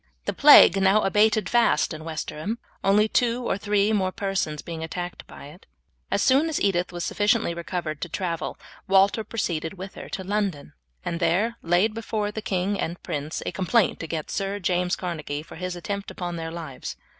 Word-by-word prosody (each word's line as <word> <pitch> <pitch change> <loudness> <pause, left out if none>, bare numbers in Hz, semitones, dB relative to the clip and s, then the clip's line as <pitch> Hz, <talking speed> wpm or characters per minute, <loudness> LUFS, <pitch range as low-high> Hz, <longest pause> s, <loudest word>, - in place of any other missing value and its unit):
The - - -1
plague 280 -10 +8
now 195 +3 +4
abated 210 +2 +3
fast 240 -7 +3
in 155 0 -8
Westerham, 160 +6 -4 0.3
only 205 +2 +4
two 240 +1 +1
or - - +1
three 205 +1 +1
more 190 -3 +1
persons 190 -7 -2
being 165 -1 -6
attacked 175 +2 -6
by - - -11
it. 175 +6 -16 0.4
As - - +1
soon 275 +5 +4
as 315 - -1
Edith 180 -3 +1
was 175 -1 -4
sufficiently 210 -3 +1
recovered 170 -3 -4
to 175 - -4
travel 170 -2 -3 0.3
Walter 195 +3 +4
proceeded 170 -7 -3
with 190 +1 -8
her - - -9
to 190 - -4
London 190 - -2 0.3
and 170 - -2
there 190 +8 +1
laid 175 +6 +2
before 215 -2 -2
the 220 - -5
king 195 0 -1
and 170 +2 -4
prince 150 +2 -4
a - - -2
complaint 195 +3 +1
against 160 -1 -4
Sir 195 +1 -2
James 180 -1 0
Carnegie 155 -5 -4
for 160 - -12
his 180 +1 -4
attempt 200 +3 -4
upon 175 -1 -5
their 165 -1 -4
lives. 165 -5 -7
185 Hz, 180 wpm, -25 LUFS, 170-210 Hz, 0.4 s, plague